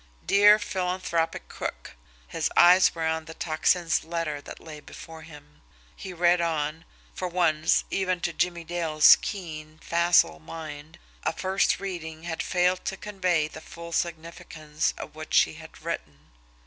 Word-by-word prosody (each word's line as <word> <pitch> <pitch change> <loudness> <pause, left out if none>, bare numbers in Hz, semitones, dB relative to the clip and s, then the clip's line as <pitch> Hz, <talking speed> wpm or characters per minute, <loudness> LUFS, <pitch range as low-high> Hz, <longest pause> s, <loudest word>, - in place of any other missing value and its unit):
"Dear 205 +1 +6
Philanthropic 180 -4 -2
Crook" - - -6 0.3
his - - -2
eyes 180 +1 +6
were 165 -1 -2
on 160 0 -1
the 160 +1 -10
Tocsin's 165 +1 +1
letter 160 -3 -3
that - - -10
lay 155 -2 -10
before 160 +2 -11
him. 150 -2 -15 0.3
He 190 - -8
read 175 0 +3
on 160 0 -2 0.3
for 185 - -4
once, 170 -3 +2
even 185 -2 0
to 175 - -2
Jimmie 175 0 -1
Dale's 160 -2 +5
keen, 155 -5 -6
facile 170 - +2
mind, 155 - -9 0.2
a - - 0
first 190 +1 +1
reading 165 -5 -6
had 165 -1 -4
failed 180 0 +1
to 195 - -3
convey 180 -6 0
the 155 0 -11
full 170 +1 -10
significance 160 -2 -3
of - - -8
what - - -5
she - - +4
had - - -13
written. 75 0 -6
165 Hz, 150 wpm, -26 LUFS, 155-180 Hz, 0.3 s, Dear